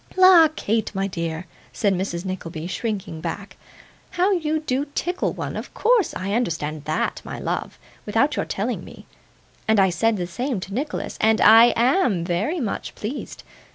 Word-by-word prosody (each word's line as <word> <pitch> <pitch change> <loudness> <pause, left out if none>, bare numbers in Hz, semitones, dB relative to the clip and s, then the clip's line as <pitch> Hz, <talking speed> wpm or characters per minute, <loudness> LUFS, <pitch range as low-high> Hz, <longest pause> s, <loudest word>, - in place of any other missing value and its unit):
'La, 370 -3 +8
Kate, 220 -2 0
my 195 0 0
dear,' 170 -2 -4 0.3
said 200 -2 +1
Mrs. 180 -1 -3
Nickleby, 170 -4 -5
shrinking 190 -4 -4
back, 190 +4 -5 0.5
'how 365 +3 +1
you 315 -4 0
do 280 -1 -1
tickle 355 +2 -1
one! - - -5
Of - - -6
course, 465 -7 +2
I 195 +2 -3
understand 155 -9 -2
THAT, 155 +1 -1
my - - -7
love, - - -3 0.3
without - - +2
your - - -1
telling - - -3
me; - - -13 0.6
and 220 -1 +4
I 190 -1 +4
said 215 +6 +1
the 180 - -2
same 240 +6 -3
to 195 - -7
Nicholas, 285 +7 -4
and 220 0 +4
I 225 +1 +8
AM 240 - +2
very 200 - -1
much 230 -8 -4
pleased. 235 +7 -6
210 Hz, 165 wpm, -23 LUFS, 180-275 Hz, 0.6 s, La